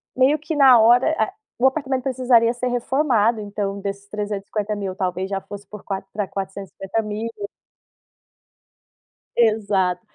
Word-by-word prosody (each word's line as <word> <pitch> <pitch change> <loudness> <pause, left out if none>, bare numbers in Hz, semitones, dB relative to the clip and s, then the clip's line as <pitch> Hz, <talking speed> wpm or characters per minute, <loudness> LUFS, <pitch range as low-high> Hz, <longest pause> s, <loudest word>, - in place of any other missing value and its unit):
meio 270 +4 +3
que 310 +1 -4
na 265 -4 +7
hora, 245 +7 +5
ah, 220 - +1 0.3
o 260 - +5
apartamento 265 -2 -1
precisaria 245 -3 +3
ser 250 +1 -3
reformado, 245 -3 +1
então 200 -1 -4
desses 200 0 -5
350.000 205 -1 -3
talvez, 185 0 -2
já 195 - -1
fosse 200 +1 -10
por 210 -2 -10
quatr 195 -1 -5
pra 205 -1 -2
450,000. 200 +3 -4 2.1
Exato, 200 -5 +2
215 Hz, 125 wpm, -22 LUFS, 200-245 Hz, 2.1 s, na